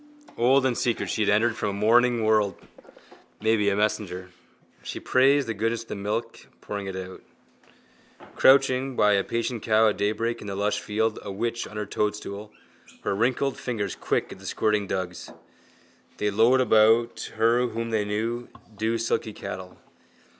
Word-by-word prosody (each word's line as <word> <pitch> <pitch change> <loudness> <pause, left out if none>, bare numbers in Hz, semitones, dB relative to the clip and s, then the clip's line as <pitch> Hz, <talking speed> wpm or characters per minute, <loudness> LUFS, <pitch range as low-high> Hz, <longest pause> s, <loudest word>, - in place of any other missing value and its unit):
Old 130 +3 +3
and 130 -2 +1
secret 120 -1 -1
she 110 - -1
had 105 - +2
entered 110 +3 +3
from 120 - -2
a - - -3
morning 115 +3 +3
world, 110 -2 +2 0.8
maybe 110 -2 +2
a 100 - 0
messenger. 95 -3 -2 0.5
She - - -6
praised 135 +1 +3
the 115 - -1
goodness 115 +2 -1
of - - -26
the - - -4
milk, 110 +3 -4
pouring 100 -1 -5
it 95 - -5
out. 95 0 -7 1.1
Crouching 135 -1 +4
by 105 -2 +4
a 100 -1 +2
patient 115 +1 -3
cow 110 0 +4
at - - -3
daybreak 110 +3 -1
in 105 - -8
the 100 - -4
lush 100 +1 0
field, 110 +1 -1
a 100 - -6
witch 115 +4 -3
on 105 - -10
her 105 - -2
toadstool, 105 0 -3 0.5
her - - -1
wrinkled 125 +5 0
fingers 115 -5 -3
quick - - -1
at - - -10
the - - -10
squirting 105 -2 0
dugs. 90 -2 -4 0.9
They 105 0 0
lowed 115 +5 +4
about 115 0 +3
her 115 +3 +3
whom 115 0 -4
they 110 -2 +1
knew, 115 +4 -3 0.3
dewsilky 110 +1 -1
cattle. 90 -2 -8
110 Hz, 165 wpm, -25 LUFS, 105-120 Hz, 1.1 s, Crouching